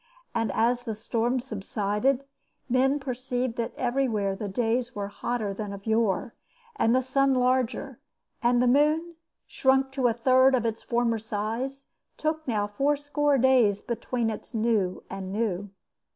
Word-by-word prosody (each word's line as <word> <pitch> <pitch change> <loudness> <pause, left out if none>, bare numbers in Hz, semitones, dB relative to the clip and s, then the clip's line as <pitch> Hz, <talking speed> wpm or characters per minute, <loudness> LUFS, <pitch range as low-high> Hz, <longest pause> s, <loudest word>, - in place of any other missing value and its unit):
And 225 -3 0
as 240 +4 +2
the 225 -3 -4
storms 235 +3 -1
subsided 215 +4 -1 0.4
men 265 +3 +2
perceived 255 -2 -3
that 230 -1 -2
everywhere 240 -6 0
the 205 +1 -5
days 240 +4 -1
were 200 -1 -3
hotter 215 -1 -3
than 205 0 -5
of 200 0 -9
yore, 220 -1 +1 0.4
and 235 - +3
the 260 - +2
sun 270 +1 +2
larger, 255 -1 0 0.4
and 240 +1 +3
the - - +3
moon, 305 +6 +3 0.3
shrunk 265 0 +2
to 265 -2 +1
a 235 - +2
third 260 +3 +4
of 240 -2 0
its 225 -1 -2
former 235 -1 0
size, 225 +6 -4 0.3
took 315 0 -2
now 210 -4 +1
fourscore 290 +5 +1
days 240 -6 +4
between 235 0 -2
its 220 +3 -8
new 215 -5 0
and 190 -1 -6
new. 205 -2 -2
240 Hz, 150 wpm, -27 LUFS, 215-260 Hz, 0.4 s, third